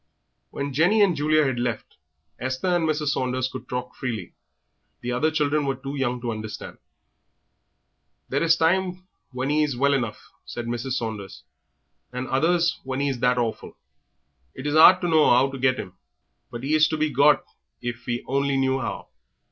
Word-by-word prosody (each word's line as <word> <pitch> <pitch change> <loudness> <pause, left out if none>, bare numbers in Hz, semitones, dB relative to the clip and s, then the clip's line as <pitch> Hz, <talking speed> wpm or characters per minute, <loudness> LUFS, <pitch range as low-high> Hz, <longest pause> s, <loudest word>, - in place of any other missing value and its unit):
When 140 0 -4
Jenny 180 +10 +4
and 185 -4 +3
Julia 155 +1 +2
had 130 -3 -1
left, 120 -2 -3 0.4
Esther 130 +7 -2
and 175 -3 +1
Mrs. 150 -1 0
Saunders 130 -2 -1
could 130 0 -9
talk 125 0 -4
freely; 115 -8 -5 0.7
the 125 - -3
other 125 +6 +1
children 150 -1 +1
were 135 -1 -1
too 135 +2 -7
young 125 -3 -1
to 120 -1 -2
understand. 110 -1 -7 1.5
"There 140 - -1
is 165 0 +4
times 180 +2 +1 0.3
when 130 +2 -2
'e 155 +1 +2
is 145 -5 0
well 140 +2 +3
enough," 120 -6 -3
said 120 - -6
Mrs. 120 +2 -3
Saunders, 105 - -5 0.7
"and 125 +1 -4
others 165 +4 +2
when 130 0 -3
'e 140 0 +1
is 125 - -5
that 125 +1 +2
awful. 115 -2 -3 0.8
It 130 - -8
is 145 +1 0
'ard 180 +4 +8
to 175 - 0
know 160 -2 +4
'ow 130 +3 +4
to 135 - -7
get 130 0 +2
him, 90 - -7 0.6
but 120 +1 -8
'e 145 +3 -1
is 155 0 +5
to 155 - -2
be 155 0 0
got 145 +3 +4 0.3
if 120 +1 -6
we 120 -1 -2
only 140 +1 +1
knew 135 0 +1
'ow. - - -5
135 Hz, 180 wpm, -24 LUFS, 125-155 Hz, 1.5 s, ard